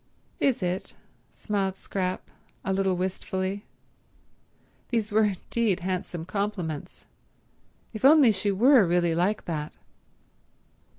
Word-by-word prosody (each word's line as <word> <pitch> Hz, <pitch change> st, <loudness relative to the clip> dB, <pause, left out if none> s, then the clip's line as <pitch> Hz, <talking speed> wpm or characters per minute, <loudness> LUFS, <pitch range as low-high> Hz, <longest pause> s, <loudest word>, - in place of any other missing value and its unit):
"Is 260 Hz, -8 st, +1 dB
it?" 180 Hz, +1 st, -3 dB, 0.4 s
smiled 195 Hz, -3 st, -2 dB
Scrap, 185 Hz, -1 st, -4 dB, 0.3 s
a 190 Hz, -, 0 dB
little 190 Hz, -1 st, +1 dB
wistfully. 190 Hz, +2 st, -3 dB, 1.2 s
These 225 Hz, -3 st, -1 dB
were 215 Hz, +1 st, +4 dB
indeed 205 Hz, 0 st, -1 dB
handsome 180 Hz, -2 st, -3 dB
compliments. 185 Hz, -6 st, -4 dB, 0.9 s
If 215 Hz, -, -7 dB
only 280 Hz, -3 st, +7 dB
she 205 Hz, 0 st, -1 dB
were 245 Hz, +5 st, +6 dB
really 175 Hz, -1 st, +2 dB
like 180 Hz, +6 st, 0 dB
that 155 Hz, -3 st, -4 dB
190 Hz, 105 wpm, -26 LUFS, 180-210 Hz, 1.2 s, only